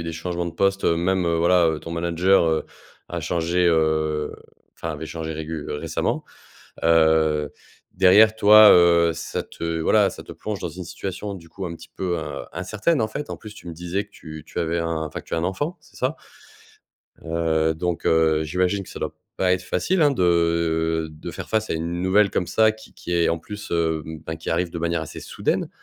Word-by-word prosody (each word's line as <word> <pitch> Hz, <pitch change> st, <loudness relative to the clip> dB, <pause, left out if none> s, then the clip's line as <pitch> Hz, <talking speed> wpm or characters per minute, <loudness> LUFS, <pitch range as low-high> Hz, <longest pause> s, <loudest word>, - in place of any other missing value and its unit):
eu 85 Hz, -, -5 dB
des 85 Hz, -, -3 dB
changements 85 Hz, +2 st, -3 dB
de 85 Hz, -, -3 dB
postes 95 Hz, +3 st, +1 dB
même, 90 Hz, +2 st, +2 dB
heu, 85 Hz, -1 st, +1 dB
voilà, 85 Hz, 0 st, +4 dB
heu, 80 Hz, -1 st, -1 dB
ton 85 Hz, -, -8 dB
manager, 85 Hz, +3 st, +2 dB
heu, 80 Hz, -, 0 dB, 0.4 s
a -, -, -4 dB
changé, 85 Hz, +2 st, 0 dB
heu 80 Hz, -2 st, +1 dB, 0.4 s
enfin, 85 Hz, -, -4 dB
avait 75 Hz, +2 st, -6 dB
changé 80 Hz, 0 st, -5 dB
régul 80 Hz, -1 st, -5 dB
récemment. 80 Hz, +2 st, -2 dB, 0.6 s
Heu, 80 Hz, -2 st, +3 dB, 0.4 s
derrière, 105 Hz, +4 st, +6 dB
toi, 110 Hz, 0 st, +8 dB
heu, 85 Hz, -1 st, +5 dB
ça 85 Hz, -, -4 dB
te 85 Hz, 0 st, -4 dB
voilà, -, -, +4 dB
ça -, -, -10 dB
te -, -, -9 dB
plonge 105 Hz, -2 st, -5 dB
dans 90 Hz, -, -4 dB
une 90 Hz, +3 st, -8 dB
situation 100 Hz, +4 st, -5 dB
du 85 Hz, -3 st, -12 dB
coup, 95 Hz, +4 st, -7 dB
un 85 Hz, -1 st, -5 dB
petit -, -, -14 dB
peu, 90 Hz, -2 st, -1 dB
in -, -, -5 dB
incertaine, 105 Hz, -, 0 dB
en 110 Hz, -, +2 dB
fait, 145 Hz, +7 st, -6 dB
en -, -, -4 dB
plus, 110 Hz, -2 st, -11 dB
tu 90 Hz, -, -11 dB
me -, -, -5 dB
disais 90 Hz, +4 st, -3 dB
que 105 Hz, -, -20 dB
tu 80 Hz, -4 st, -10 dB
tu -, -, -7 dB
avais 85 Hz, 0 st, 0 dB
un 85 Hz, -1 st, -2 dB
enfin 80 Hz, -, -6 dB
que -, -, -24 dB
tu -, -, -4 dB
as -, -, 0 dB
un 80 Hz, -, -1 dB
enfant, 145 Hz, -, -2 dB
c'est -, -, -21 dB
ça? 130 Hz, +5 st, -1 dB, 1.1 s
Heu, 80 Hz, -1 st, 0 dB
donc 85 Hz, +1 st, -3 dB
heu, 80 Hz, -1 st, +3 dB
j'imagine 90 Hz, +5 st, 0 dB
que -, -, -13 dB
ça -, -, -8 dB
doit -, -, -4 dB, 0.2 s
pas 90 Hz, -1 st, +2 dB
être 90 Hz, 0 st, 0 dB
facile, 160 Hz, -, 0 dB
hein, 145 Hz, -, +5 dB
de 85 Hz, -, +1 dB
de 75 Hz, -, -8 dB
faire -, -, -8 dB
face 110 Hz, 0 st, 0 dB
à -, -, +1 dB
une 85 Hz, +2 st, -3 dB
nouvelle 100 Hz, +2 st, +4 dB
comme 90 Hz, -, -1 dB
ça 110 Hz, -1 st, +3 dB
qui 110 Hz, 0 st, -15 dB
qui 90 Hz, -, -6 dB
est, 85 Hz, -1 st, +3 dB
en 85 Hz, -, 0 dB
plus, 105 Hz, +5 st, -9 dB
hem, 80 Hz, -2 st, -1 dB
ben, 80 Hz, 0 st, -4 dB
qui 80 Hz, -, -5 dB
arrive 85 Hz, +1 st, 0 dB
de 85 Hz, -, -5 dB
manière 85 Hz, -1 st, -1 dB
assez 80 Hz, -, -8 dB
soudaine, -, -, -2 dB
85 Hz, 215 wpm, -23 LUFS, 80-95 Hz, 1.1 s, toi